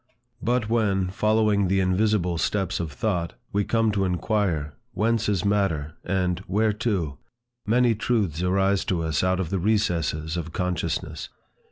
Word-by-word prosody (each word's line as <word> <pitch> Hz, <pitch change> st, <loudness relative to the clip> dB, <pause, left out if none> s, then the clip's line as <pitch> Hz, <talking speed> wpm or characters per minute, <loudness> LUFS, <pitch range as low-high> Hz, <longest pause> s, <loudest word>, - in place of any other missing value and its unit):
But 120 Hz, -1 st, +1 dB
when, 100 Hz, -5 st, +1 dB
following 105 Hz, -1 st, +2 dB
the 95 Hz, +1 st, +2 dB
invisible 95 Hz, -2 st, +1 dB
steps 95 Hz, +1 st, 0 dB
of 85 Hz, -3 st, -3 dB
thought, 85 Hz, 0 st, -1 dB, 0.2 s
we 100 Hz, +1 st, +2 dB
come 115 Hz, +1 st, +1 dB
to 100 Hz, -2 st, 0 dB
inquire, 90 Hz, -5 st, 0 dB, 0.2 s
Whence 115 Hz, 0 st, +1 dB
is 100 Hz, -2 st, 0 dB
matter? 95 Hz, -8 st, 0 dB
and 90 Hz, -1 st, 0 dB
Whereto? 105 Hz, -7 st, 0 dB, 0.5 s
many 120 Hz, +1 st, +4 dB
truths 100 Hz, -7 st, 0 dB
arise 95 Hz, +1 st, +2 dB
to 85 Hz, -3 st, 0 dB
us 80 Hz, 0 st, 0 dB
out 95 Hz, 0 st, +1 dB
of 85 Hz, -4 st, -3 dB
the 95 Hz, -, 0 dB
recesses 85 Hz, -6 st, 0 dB
of 85 Hz, -1 st, -5 dB
consciousness. 90 Hz, -2 st, -2 dB
95 Hz, 145 wpm, -25 LUFS, 85-105 Hz, 0.5 s, many